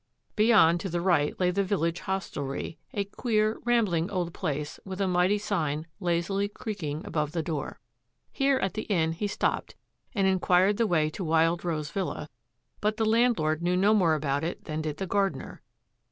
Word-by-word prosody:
Beyond 210 -7 +5
to 190 - -4
the 175 0 -1
right 170 -5 +1
lay 180 -1 +3
the 200 +2 +1
village 175 -3 0
hostelry, 155 -7 -4
a 200 - -1
queer, 215 +1 0
rambling 205 -9 +2
old 180 -4 -2
place 150 -3 -3
with 190 0 -7
a 195 - +1
mighty 180 +3 +3
sign 160 -8 -2
lazily 180 +2 0
creaking 170 -8 -5
above 150 -1 -2
the 165 -2 -1
door. 155 -2 -4 0.5
Here 275 -1 +2
at 195 -7 -1
the 215 - -5
inn 165 -5 +2
he 185 +6 -2
stopped 205 - -1 0.4
and 195 -2 +2
inquired 190 +1 +3
the 230 - +2
way 155 -4 +2
to 190 - -5
Wild 165 +1 +2
Rose 155 -4 -2
Villa, 185 -6 -3 0.5
but 215 +1 0
the 220 - +1
landlord 215 -9 +2
knew 180 +1 +1
no 200 +3 +4
more 175 -7 +4
about 145 -1 -1
it 170 - -4
than 155 0 -3
did 155 -1 -4
the 195 - -3
gardener. 195 +1 -1
180 Hz, 180 wpm, -28 LUFS, 160-205 Hz, 0.5 s, Beyond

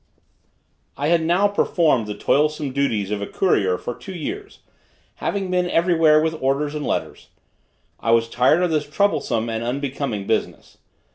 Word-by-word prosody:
I 145 +3 -1
had 170 -1 +3
now 175 +5 +3
performed 165 - +1
the 105 0 -5
toilsome 150 +3 +1
duties 115 -8 -1
of 105 -1 -2
a 100 - -3
courier 95 - +1
for 120 - -5
two 190 - -10
years, 400 - -6 0.6
having 195 -2 -2
been 180 -1 +1
every 175 +1 +2
where 155 -2 +5
with 160 0 -2
orders 140 +3 0
and 150 -1 -4
letters. - - -3 0.7
I 115 - -3
was 115 0 +4
tired 130 +9 +3
of 175 - +1
this 150 -2 -1
troublesome 150 - 0
and 115 0 -3
unbecoming 130 -4 -3
business. 110 +1 -3
150 Hz, 160 wpm, -21 LUFS, 115-170 Hz, 0.7 s, where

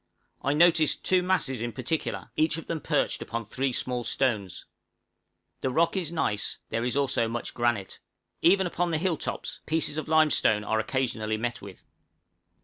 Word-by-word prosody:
I 140 - +1
noticed 165 -1 +4
two 185 -1 +4
masses 180 -10 0
in 120 -1 -3
particular, 135 +5 -3
each 155 0 +2
of 165 - -7
them 165 -2 -3
perched - - 0
upon 115 0 -4
three 130 +5 -1
small 125 0 -2
stones. 110 -6 -1 0.9
The 130 - -1
rock 165 +7 +2
is 175 -4 -1
gneiss; 105 -11 0
there 115 +1 -1
is 125 +3 -1
also 130 -4 +2
much 115 +1 -4
granite. 120 -5 -1 0.4
Even 190 +2 +5
upon 175 0 -1
the 160 - 0
hill 175 +1 +1
tops - - -4
pieces 160 -1 0
of 155 - -3
limestone 155 -9 +3
are 110 +1 0
occasionally 110 -2 -1
met 120 +2 -3
with. 100 -2 -11
130 Hz, 165 wpm, -27 LUFS, 115-160 Hz, 0.9 s, Even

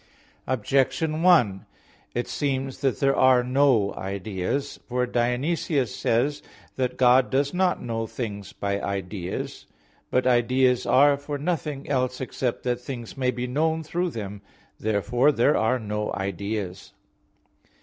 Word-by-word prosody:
Objection 135 +6 +1
1: 125 - +4 0.5
It 120 - -1
seems 135 -2 -2
that 135 -3 0
there 135 -1 +3
are 130 -1 +5
no 125 -5 +3
ideas. 100 +8 -3
For 125 0 +1
Dionysius 125 +3 0
says 140 +6 +1
(Div. - - -24
Nom. - - -22
vii), - - -23 0.2
that 125 0 -19
God 125 0 +5
does 140 +1 +1
not 180 0 +1
know 115 -1 -3
things 105 -5 -5
by 100 0 -2
ideas. 95 -2 -4 0.4
But 125 0 +1
ideas 125 0 +3
are 140 +2 +5
for 145 +1 -5
nothing 150 -2 -3
else 130 -2 0
except 125 -1 -3
that 125 -1 -1
things 120 -3 -7
may 130 -2 0
be 125 0 -2
known 160 +5 0
through 175 +3 -1
them. 105 - -6 0.4
Therefore 120 +6 +2
there 140 +3 +3
are 110 +4 +2
no 105 -2 -3
ideas. 100 0 -4
125 Hz, 140 wpm, -25 LUFS, 110-140 Hz, 0.5 s, are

